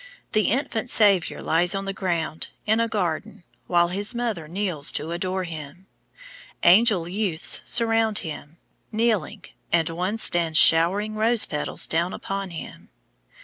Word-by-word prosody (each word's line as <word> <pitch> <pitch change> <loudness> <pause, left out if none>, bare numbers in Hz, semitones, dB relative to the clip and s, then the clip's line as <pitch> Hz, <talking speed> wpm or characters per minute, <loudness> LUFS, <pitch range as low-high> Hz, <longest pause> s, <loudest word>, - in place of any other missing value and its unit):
The 215 -1 +1
Infant 240 -1 -2
Saviour 200 -7 +3
lies 175 +4 +2
on 195 0 -3
the 195 - -3
ground, 170 -4 -3 0.2
in 220 +1 +2
a 230 - +1
garden, 205 -1 -3 0.2
while 175 -1 +2
his 205 +6 -3
mother 225 -10 -3
kneels 175 -4 -1
to 155 +3 -4
adore 185 +2 -2
him. 160 +1 -9 0.8
Angel 190 -1 +5
youths 185 -3 -1
surround 225 -2 +2
him, 155 0 -8 0.3
kneeling, 215 -3 -1 0.3
and 165 -2 +2
one 180 +6 -2
stands 170 -7 +2
showering 185 +8 +4
rose 220 +1 +2
petals 150 -1 0
down 170 +3 -1
upon 195 -1 -5
him. 165 -2 -10
190 Hz, 140 wpm, -23 LUFS, 165-215 Hz, 0.8 s, Angel